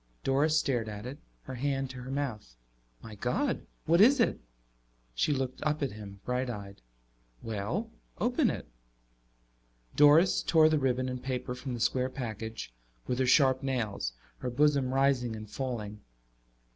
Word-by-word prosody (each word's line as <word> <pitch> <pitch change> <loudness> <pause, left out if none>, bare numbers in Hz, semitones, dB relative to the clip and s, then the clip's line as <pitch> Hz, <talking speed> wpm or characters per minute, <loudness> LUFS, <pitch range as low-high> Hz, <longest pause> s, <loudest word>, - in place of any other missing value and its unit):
Doris 145 +4 +3
stared 120 -7 0
at 105 +1 -7
it, 135 +4 -7 0.2
her 130 - -7
hand 135 +1 -1
to 130 -1 -8
her 125 - -8
mouth. 130 - -4 0.5
"My 110 - -9
God, 180 - -1 0.2
what 170 +3 +5
is 265 +6 +7
it?" 230 - +2 0.7
She - - +1
looked 130 -2 -2
up 150 0 0
at 135 - -1
him, 100 -2 -10
bright 125 +1 -1
eyed. 100 - -7 0.6
"Well, 115 - -3 0.3
open 245 +2 +2
it." - - -5 1.3
Doris 150 +5 +6
tore 160 -1 +5
the 155 -1 +2
ribbon 130 -1 +1
and 125 -1 -4
paper 125 -2 -3
from 125 0 -5
the - - -6
square 125 +2 +1
package 110 - -6 0.3
with 125 - -2
her 130 - +2
sharp 130 0 +5
nails, 115 - -2 0.3
her - - -3
bosom 140 0 +2
rising 135 -4 +2
and 110 0 -8
falling. 110 -4 -4
130 Hz, 155 wpm, -30 LUFS, 115-145 Hz, 1.3 s, is